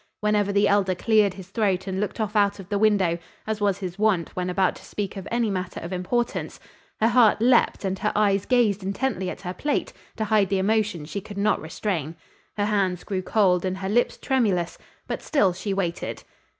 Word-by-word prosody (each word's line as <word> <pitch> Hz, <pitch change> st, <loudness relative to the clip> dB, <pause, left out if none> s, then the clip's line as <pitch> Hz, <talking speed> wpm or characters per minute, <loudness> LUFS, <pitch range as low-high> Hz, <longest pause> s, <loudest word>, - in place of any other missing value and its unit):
Whenever 210 Hz, -1 st, +1 dB
the 200 Hz, +1 st, +3 dB
Elder 195 Hz, -2 st, +2 dB
cleared 210 Hz, 0 st, +3 dB
his 190 Hz, -2 st, -11 dB
throat 195 Hz, -3 st, 0 dB
and 190 Hz, -1 st, -3 dB
looked 210 Hz, +3 st, -3 dB
off 215 Hz, -1 st, -2 dB
out 205 Hz, -1 st, +3 dB
of 190 Hz, -1 st, -10 dB
the 205 Hz, -2 st, 0 dB
window, 195 Hz, -6 st, +3 dB, 0.3 s
as 215 Hz, -1 st, -3 dB
was 200 Hz, -2 st, +2 dB
his 185 Hz, -1 st, -6 dB
wont 205 Hz, -6 st, +1 dB
when 180 Hz, 0 st, -2 dB
about 185 Hz, 0 st, +1 dB
to -, -, -15 dB
speak 205 Hz, -1 st, -5 dB
of 195 Hz, -1 st, -7 dB
any 235 Hz, -1 st, +1 dB
matter 185 Hz, -1 st, -4 dB
of 170 Hz, +3 st, -6 dB
importance, 235 Hz, +7 st, -2 dB, 0.4 s
her 220 Hz, -, +4 dB
heart 235 Hz, -4 st, +5 dB
leaped 235 Hz, -3 st, +3 dB
and 190 Hz, 0 st, -2 dB
her 210 Hz, -, 0 dB
eyes 200 Hz, -2 st, +2 dB
gazed 225 Hz, -6 st, +3 dB
intently 195 Hz, -1 st, -2 dB
at -, -, -7 dB
her 180 Hz, -2 st, -4 dB
plate, 290 Hz, +9 st, -2 dB, 0.2 s
to 220 Hz, -, -2 dB
hide 210 Hz, -3 st, +2 dB
the 195 Hz, -, +1 dB
emotion 205 Hz, -4 st, 0 dB
she 200 Hz, +6 st, -5 dB
could 205 Hz, +1 st, -10 dB
not 210 Hz, +1 st, +1 dB
restrain. 160 Hz, -1 st, -3 dB, 0.4 s
Her 205 Hz, -, +1 dB
hands 195 Hz, -4 st, 0 dB
grew 190 Hz, -2 st, -2 dB
cold 185 Hz, -3 st, +2 dB
and 185 Hz, 0 st, -2 dB
her 190 Hz, 0 st, -4 dB
lips 240 Hz, +4 st, +1 dB
tremulous, 200 Hz, -10 st, 0 dB, 0.3 s
but -, -, -3 dB
still 200 Hz, -, +2 dB
she 190 Hz, +3 st, -4 dB
waited. 180 Hz, -3 st, -3 dB
200 Hz, 205 wpm, -24 LUFS, 185-215 Hz, 0.4 s, heart